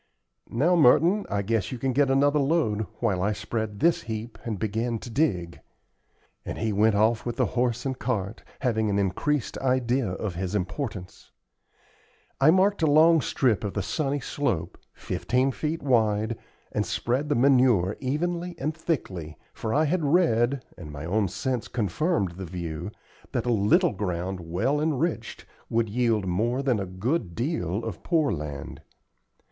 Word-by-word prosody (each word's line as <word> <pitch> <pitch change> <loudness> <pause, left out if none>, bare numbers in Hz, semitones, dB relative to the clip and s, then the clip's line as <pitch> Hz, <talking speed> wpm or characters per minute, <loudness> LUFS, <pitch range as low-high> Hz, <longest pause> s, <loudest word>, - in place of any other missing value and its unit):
"Now, 155 +10 +2
Merton, 170 +7 +4
I 100 -1 -1
guess 110 -2 -1
you 130 - -4
can 130 +2 -1
get 140 +1 +3
another 145 +2 +3
load, 135 -8 +1
while 100 -6 +1
I 105 +3 +1
spread 105 0 -4
this 170 0 +3
heap 115 0 -6
and 110 -3 -3
begin 115 +3 -1
to 120 +2 -9
dig;" 95 - 0 0.8
and - - -5
he 110 -2 -1
went 105 +1 +3
off 110 +2 +2
with 120 - -3
the - - +2
horse 125 0 0
and 130 -1 -2
cart, 105 -4 -2 0.2
having 110 -4 +1
an 100 - +1
increased 105 +9 -1
idea 130 -1 +1
of 100 0 -3
his 95 +3 -3
importance. 100 -1 -4 1.1
I 135 +3 +6
marked 190 +3 +3
a 160 - +4
long 160 +2 +6
strip 120 -8 +1
of 100 - -4
the 100 - -1
sunny 140 +7 -1
slope, 130 - -2
fifteen 130 +2 -1
feet 155 +4 -3
wide, 110 -4 +2 0.4
and - - 0
spread 130 +5 -1
the 145 - +2
manure 125 -7 +4
evenly 175 +6 -2
and 155 +2 -2
thickly, 95 - -3 0.2
for 110 - -4
I 150 +6 +3
had 165 +2 0
read, 140 -5 +2
and 75 -4 -8
my 75 +1 -7
own 100 +3 +1
sense 120 +5 -2
confirmed 110 - 0
the 95 - -5
view, 85 0 -5 0.4
that - - -1
a 120 - +1
little 105 0 +3
ground 95 -1 -3
well 95 - -1
enriched 155 -5 -2 0.2
would 115 -1 +1
yield 115 -2 +1
more 115 +9 0
than 125 -6 +1
a 100 - -3
good 95 - -2
deal 115 - -2
of 110 -6 -5
poor 160 -5 +1
land. 75 -5 -6
115 Hz, 165 wpm, -26 LUFS, 100-140 Hz, 1.1 s, I